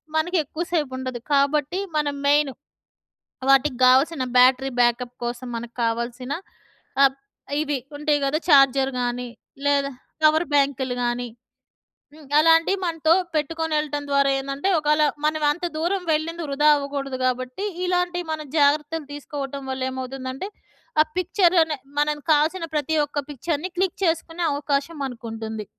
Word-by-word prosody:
మనకి 350 Hz, +3 st, +1 dB
ఎక్కువ 310 Hz, +4 st, -5 dB
సేపుండదు. 260 Hz, -5 st, -2 dB
కాబట్టి 290 Hz, +5 st, +2 dB, 0.2 s
మనం 290 Hz, -1 st, 0 dB
మెయిన్ 290 Hz, -1 st, +3 dB, 1.0 s
వాటికి 275 Hz, 0 st, +4 dB
కావాల్సిన 265 Hz, +2 st, +4 dB
బ్యాటరీ 260 Hz, +2 st, +5 dB
బ్యాకప్ 240 Hz, +1 st, +1 dB
కోసం 240 Hz, +1 st, -4 dB
మనకు 235 Hz, 0 st, -7 dB
కావాల్సిన, 235 Hz, +3 st, -2 dB, 0.7 s
ఆహ్, 270 Hz, -1 st, +5 dB, 0.5 s
ఇవి 290 Hz, -3 st, -1 dB, 0.2 s
ఉంటాయి 300 Hz, 0 st, +2 dB
గద. 275 Hz, +3 st, +1 dB
ఛార్జర్ 275 Hz, -1 st, +5 dB
గానీ 245 Hz, 0 st, -2 dB, 0.4 s
లేదా 280 Hz, -1 st, +2 dB, 0.3 s
పవర్‌బ్యాంకులు 285 Hz, -5 st, +2 dB
గానీ. 240 Hz, 0 st, -1 dB, 0.9 s
హ్మ్, 310 Hz, -1 st, -15 dB
అలాంటివి 330 Hz, +4 st, +4 dB
మనతో 325 Hz, -1 st, +2 dB, 0.2 s
పెట్టుకొని 320 Hz, +1 st, -1 dB
వెళ్ళటం 290 Hz, -1 st, -2 dB
ద్వారా 280 Hz, 0 st, +3 dB
ఏందంటే 275 Hz, +6 st, -2 dB
ఒకాళ 300 Hz, 0 st, +2 dB, 0.2 s
మనం 310 Hz, 0 st, 0 dB
అంత 350 Hz, +4 st, -4 dB
దూరం 360 Hz, +4 st, -1 dB
వెళ్ళింది 330 Hz, +2 st, -2 dB
వృధా 290 Hz, +2 st, +1 dB
అవ్వకూడదు 280 Hz, -2 st, -4 dB
కాబట్టి 255 Hz, +8 st, -2 dB, 0.2 s
ఇలాంటివి 355 Hz, -1 st, 0 dB
మనం 305 Hz, -1 st, -5 dB
జాగ్రత్తలు 300 Hz, +1 st, +2 dB
తీసుకోవటం 280 Hz, -1 st, -6 dB
వల్ల 260 Hz, 0 st, -4 dB
ఏమవుతుందంటే, 260 Hz, +6 st, -5 dB, 0.5 s
ఆ -, -, +7 dB
పిక్చర్ 365 Hz, 0 st, +2 dB
అనే 310 Hz, -3 st, -3 dB, 0.2 s
మన 295 Hz, 0 st, +1 dB
కావాల్సిన 320 Hz, +4 st, +2 dB
ప్రతి 300 Hz, +2 st, 0 dB
ఒక్క 290 Hz, 0 st, -4 dB
పిక్చర్‍ని 315 Hz, +5 st, -3 dB
క్లిక్ 375 Hz, -1 st, 0 dB
చేసుకునే 330 Hz, +1 st, -1 dB
అవకాశం 285 Hz, +2 st, -2 dB
మనకుంటుంది. 225 Hz, -3 st, -6 dB
290 Hz, 130 wpm, -23 LUFS, 260-315 Hz, 1.0 s, ఆ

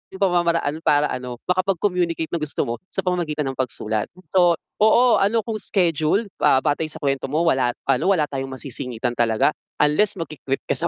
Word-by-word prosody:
'yung 190 Hz, -, -11 dB
pamamaraan 170 Hz, -4 st, +1 dB
para 145 Hz, 0 st, +3 dB
ano 125 Hz, -1 st, -5 dB
makapag-communicate 180 Hz, -3 st, 0 dB
ng 170 Hz, -, 0 dB
gusto 155 Hz, -2 st, -2 dB
mo 115 Hz, -, -2 dB, 0.2 s
sa 190 Hz, -, -1 dB
pamamagitan 160 Hz, -5 st, -1 dB
ng 135 Hz, -, -6 dB
pagsulat. 110 Hz, -4 st, -2 dB, 0.3 s
So, 175 Hz, -2 st, +5 dB, 0.3 s
oo, 220 Hz, +3 st, +6 dB, 0.2 s
ano 220 Hz, +3 st, +2 dB
kung 225 Hz, -2 st, -3 dB
scheduled, 180 Hz, +1 st, +1 dB
ah, 130 Hz, -, +4 dB
batay 150 Hz, +1 st, 0 dB
sa -, -, -8 dB
kuwento 135 Hz, -1 st, 0 dB
mo 155 Hz, +4 st, +1 dB
wala 130 Hz, -6 st, +2 dB, 0.2 s
ano, 185 Hz, +10 st, +3 dB
wala 155 Hz, -, +1 dB
tayong 135 Hz, -1 st, -4 dB
masisingitan 125 Hz, -2 st, -4 dB
talaga 115 Hz, +4 st, +2 dB, 0.3 s
unless 155 Hz, +8 st, +3 dB
magki-quit 155 Hz, -5 st, -4 dB
ka -, -, +2 dB
sa 170 Hz, -, +2 dB
155 Hz, 175 wpm, -22 LUFS, 135-180 Hz, 0.3 s, oo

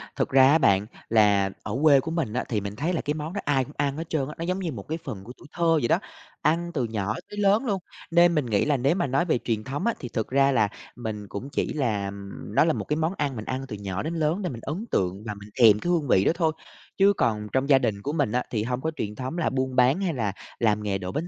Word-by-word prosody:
Thật -, -, 0 dB
ra 135 Hz, 0 st, +6 dB
á 155 Hz, -, +6 dB
bạn, 100 Hz, -9 st, +3 dB, 0.2 s
là 105 Hz, -3 st, +4 dB
ở -, -, -3 dB
quê 145 Hz, -3 st, +7 dB
của 160 Hz, +5 st, -4 dB
mình 160 Hz, -10 st, -1 dB
á, 125 Hz, -, 0 dB
thì 110 Hz, -4 st, 0 dB
mình 100 Hz, +1 st, -5 dB
thấy 160 Hz, +10 st, -1 dB
là 165 Hz, -, 0 dB
cái 150 Hz, -, -1 dB
món 155 Hz, +2 st, -5 dB
đó 200 Hz, -, -3 dB
ai 135 Hz, -2 st, +2 dB
cũng 145 Hz, -, -13 dB
ăn 140 Hz, 0 st, 0 dB
hết 165 Hz, 0 st, -5 dB
trơn 140 Hz, -4 st, 0 dB
á, 150 Hz, -, -7 dB
nó 165 Hz, -, -4 dB
giống 185 Hz, +2 st, -1 dB
như 175 Hz, -4 st, -2 dB
một 100 Hz, -8 st, -8 dB
cái 160 Hz, -, -2 dB
phần 110 Hz, -10 st, -6 dB
của 120 Hz, -, -10 dB
tuổi -, -, -15 dB
thơ 170 Hz, -, -2 dB, 0.2 s
vậy 120 Hz, -, 0 dB
đó, -, -, +3 dB, 0.4 s
ăn 170 Hz, +2 st, +1 dB
từ 135 Hz, -, 0 dB
nhỏ 110 Hz, -2 st, -2 dB
tới 205 Hz, -, -9 dB
lớn 205 Hz, +5 st, +3 dB
luôn. 200 Hz, -5 st, 0 dB, 0.3 s
Nên 170 Hz, 0 st, +5 dB
mình 150 Hz, -4 st, +1 dB
nghĩ 105 Hz, -4 st, +1 dB
là 150 Hz, -2 st, +2 dB
nếu 135 Hz, +6 st, +2 dB
mà 175 Hz, -4 st, 0 dB
nói 135 Hz, +7 st, +1 dB
về 165 Hz, -, +2 dB
truyền 110 Hz, -3 st, -1 dB
thống 135 Hz, -, -4 dB
á 235 Hz, -, +2 dB
thì 125 Hz, -, -6 dB
thực 110 Hz, -2 st, -2 dB
ra 140 Hz, +1 st, +4 dB
là 110 Hz, -6 st, +3 dB, 0.3 s
mình 110 Hz, -4 st, -5 dB
cũng 100 Hz, +8 st, -6 dB
chỉ -, -, -1 dB
là 105 Hz, -9 st, -1 dB, 0.4 s
nó -, -, +6 dB
là 165 Hz, -, +2 dB
một -, -, -3 dB
cái 150 Hz, -, -1 dB
món 160 Hz, +3 st, 0 dB
ăn 145 Hz, -3 st, -1 dB
mình 110 Hz, -2 st, -6 dB
ăn 130 Hz, +1 st, -3 dB
từ 110 Hz, -, -5 dB
nhỏ 95 Hz, -1 st, -3 dB
đến 160 Hz, +2 st, -3 dB
lớn 160 Hz, +4 st, 0 dB
để 180 Hz, -, -2 dB
mình 115 Hz, -3 st, -7 dB
ấn 165 Hz, -, -4 dB
tượng 95 Hz, +2 st, 0 dB
và 105 Hz, -, -2 dB
mình 105 Hz, +1 st, -12 dB
thèm 105 Hz, -3 st, +7 dB
cái 175 Hz, -, -3 dB
hương 165 Hz, -5 st, +1 dB
vị 95 Hz, -5 st, +4 dB
đó -, -, +5 dB
thôi, 165 Hz, -2 st, +2 dB, 0.5 s
chứ 200 Hz, +1 st, +5 dB
còn 105 Hz, -3 st, 0 dB
trong 130 Hz, +2 st, +1 dB
gia 135 Hz, -2 st, +7 dB
đình 110 Hz, -6 st, -1 dB
của 145 Hz, +7 st, -3 dB
mình 145 Hz, -9 st, +1 dB
á, 125 Hz, +1 st, +1 dB
thì 110 Hz, -3 st, 0 dB
hông 125 Hz, +2 st, -2 dB
có 160 Hz, -, -1 dB
truyền 105 Hz, -7 st, -4 dB
thống 130 Hz, +7 st, -5 dB
là 170 Hz, -, +1 dB
buôn 130 Hz, -1 st, -2 dB
bán 130 Hz, +8 st, +4 dB
hay 180 Hz, -4 st, 0 dB
là 110 Hz, -7 st, -1 dB, 0.3 s
làm 105 Hz, -2 st, +2 dB
nghề 100 Hz, -2 st, 0 dB
đổ 90 Hz, -1 st, -5 dB
bánh 160 Hz, +4 st, -3 dB
135 Hz, 295 wpm, -26 LUFS, 110-160 Hz, 0.5 s, quê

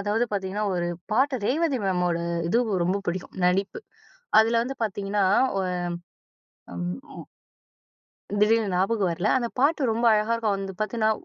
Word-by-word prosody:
அதாவது 210 Hz, +4 st, +1 dB
பாத்திங்கன்னா 200 Hz, +1 st, -2 dB
ஒரு 175 Hz, -1 st, -1 dB, 0.2 s
பாட்டு 265 Hz, +4 st, +2 dB
ரேவதி 285 Hz, 0 st, +1 dB
மேமோட 180 Hz, -2 st, +1 dB, 0.3 s
இது 230 Hz, -, +3 dB, 0.3 s
ரொம்ப 185 Hz, +3 st, +1 dB
பிடிக்கும் 180 Hz, +2 st, -4 dB
நடிப்பு. 195 Hz, -, 0 dB, 0.6 s
அதுல 230 Hz, +1 st, +2 dB
வந்து 260 Hz, +3 st, -4 dB
பார்த்திங்கன்னா, 200 Hz, -1 st, -1 dB, 1.5 s
அம் 90 Hz, 0 st, -4 dB, 0.3 s
அம் -, -, -10 dB, 1.1 s
திடீர்னு 215 Hz, -1 st, +3 dB
ஞாபகம் 190 Hz, +1 st, +1 dB
வரல, 175 Hz, +4 st, -1 dB
அந்த 240 Hz, -2 st, -1 dB
பாட்டு 280 Hz, -2 st, +2 dB
ரொம்ப 230 Hz, +2 st, 0 dB
அழகா 215 Hz, +2 st, +1 dB
இருக்கும். 220 Hz, -3 st, 0 dB
அது 195 Hz, -, -6 dB
பார்த்திங்கன்னா, 220 Hz, 0 st, +1 dB
210 Hz, 135 wpm, -25 LUFS, 190-230 Hz, 1.5 s, இது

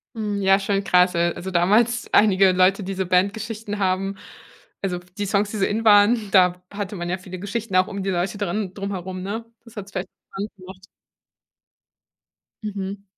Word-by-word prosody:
Hm, 210 Hz, -2 st, -2 dB
ja, 195 Hz, +1 st, +5 dB
schon 195 Hz, 0 st, -1 dB
krass. 180 Hz, -1 st, +3 dB
Al 170 Hz, 0 st, +1 dB
also 190 Hz, -, -6 dB
damals 215 Hz, +7 st, +2 dB
einige 195 Hz, -2 st, +5 dB
Leute, 185 Hz, +2 st, +3 dB
die 195 Hz, +1 st, -4 dB
so 190 Hz, 0 st, -2 dB
Bandgeschichten 205 Hz, +3 st, -1 dB
haben 195 Hz, +1 st, 0 dB, 0.7 s
also 180 Hz, -2 st, -1 dB, 0.2 s
die 205 Hz, -, -1 dB
Songs, 200 Hz, +1 st, +1 dB
die -, -, -6 dB
so 195 Hz, -, 0 dB
in 225 Hz, +2 st, -2 dB
waren, 210 Hz, +1 st, +5 dB
da 180 Hz, -2 st, +4 dB
hatte 205 Hz, 0 st, -5 dB
man 175 Hz, 0 st, -4 dB
ja 185 Hz, -, -1 dB
viele 185 Hz, -1 st, -9 dB
Geschichten 205 Hz, +1 st, -4 dB
auch 185 Hz, -, +4 dB
um 200 Hz, -1 st, -5 dB
die 195 Hz, -, -2 dB
Leute 180 Hz, +3 st, -1 dB
dran 200 Hz, -1 st, -2 dB
drumherum, 190 Hz, -2 st, -5 dB
ne? 220 Hz, +4 st, -4 dB, 0.2 s
Das 230 Hz, -, -16 dB
hat's 200 Hz, -1 st, -7 dB
vielleicht -, -, -4 dB, 0.2 s
bekannt 205 Hz, +2 st, -5 dB
gemacht. 190 Hz, +1 st, -13 dB, 1.8 s
Mhm. 200 Hz, -1 st, -5 dB
195 Hz, 180 wpm, -23 LUFS, 185-205 Hz, 1.8 s, ja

